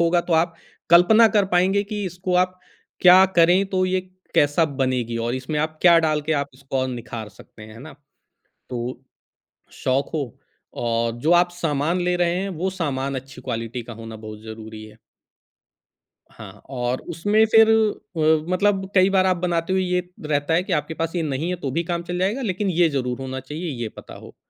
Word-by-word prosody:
होगा, 170 +1 +3
तो 170 - -4
आप 165 -1 -5 0.4
कल्पना 215 +7 +7
कर 200 - +4
पाएँगे 195 +3 +3
कि 205 -1 -2
इसको 180 +1 -3
आप 185 0 -14 0.4
क्या 185 +1 +8
करें 175 +3 +5
तो 185 -1 +1
ये 185 0 0 0.3
कैसा 145 +3 +3 0.2
बनेगी 125 -3 -1
और 120 - -1
इसमें 130 +4 -3
आप 155 0 -3
क्या 170 -2 +7
डाल 155 -2 +1
के, 155 +2 -2
आप 140 -1 -1
इसको 135 0 -6
और 130 - 0
निखार 115 -3 -6
सकते 105 +1 -16
हैं, 110 0 -11
है - - -12
ना? 155 +2 -10 0.8
तो 125 0 -5 0.7
शौक 135 +2 -1
हो 140 -7 -4 0.4
और 115 0 0
जो 165 +3 +3
आप 175 0 +4
सामान 165 0 -1
ले 180 0 +1
रहे 175 -1 +1
हैं, 195 +2 -2
वो 185 +1 -2
सामान 140 -7 -3
अच्छी 135 +1 -9
क्वालिटी 115 -1 -4
का 115 - -10
होना 115 0 -9
बहुत 110 0 -10
ज़रूरी 110 -1 -9
है। 110 - -14 1.4
हाँ, - - -12
और 125 -1 -2
उसमें 205 +7 +2
फिर 225 0 +7
अ, 170 -8 +1
मतलब 190 0 +1
कई 185 +1 +5
बार 190 -1 +3
आप 185 -1 +2
बनाते 170 0 -1
हुए 190 - +2
ये 180 0 0 0.3
रहता 145 +1 0
है 175 - +2
कि - - -3
आपके 150 +2 -1
पास 165 +2 -2
ये 170 - 0
नहीं 150 +3 -2
है 180 - -1
तो 135 - -1
भी 165 +4 -1
काम 170 0 -3
चल 175 +1 -4
जाएगा 205 +8 0
लेकिन 195 -2 -1
ये 175 -1 +3
ज़रूर 125 -3 -2
होना 130 0 -5
चाहिए, 150 +6 -6
ये 120 -5 -4
पता - - -11
हो। - - -13
165 Hz, 200 wpm, -22 LUFS, 130-180 Hz, 1.4 s, क्या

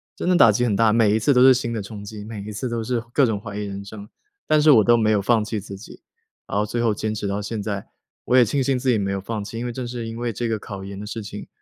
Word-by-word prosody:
真 - - -2
的 180 - +4
打 115 -10 +7
击 110 +4 0
很 115 - +1
大， 110 +1 +4
每 110 -2 +4
一 - - +2
次 140 +6 +3
都 125 - +4
是 130 0 +8
新 120 -2 -2
的 110 - -3
冲 100 +1 -9
击， 105 0 -8
每 110 -2 -7
一 105 - -7
次 105 +5 -4
都 115 -1 -2
是 120 +1 -1
各 140 - +4
种 110 -4 -1
怀 100 -1 -8
疑 105 - -3
人 100 0 -6
生。 100 +1 -10 0.4
但 155 -1 +4
是 155 0 +6
我 110 -6 +6
都 120 +3 +5
没 110 -2 +2
有 105 -2 +2
放 110 +2 +2
弃 105 0 -3
自 100 0 -9
己， 100 - -13 0.4
然 - - -3
后 105 - +1
最 120 +2 -2
后 115 -2 +2
坚 110 +1 -3
持 105 - -4
到 100 +1 -2
现 105 +1 -4
在， 100 -2 -4 0.4
我 125 - +2
也 130 - +7
庆 135 +5 0
幸 135 0 +1
自 130 +1 -1
己 120 - +3
没 100 -1 -1
有 100 0 -2
放 110 +2 -4
弃， 110 +3 -7
因 120 - -4
为 120 - -3
正 125 0 -5
是 120 -2 -5
因 115 0 -6
为 120 -1 -3
这 120 +2 -3
个 110 -1 -1
考 100 -2 -8
研 100 0 -8
的 105 - -6
事 110 +1 -5
情， 105 0 -8
110 Hz, 350 characters per minute, -22 LUFS, 105-120 Hz, 0.4 s, 是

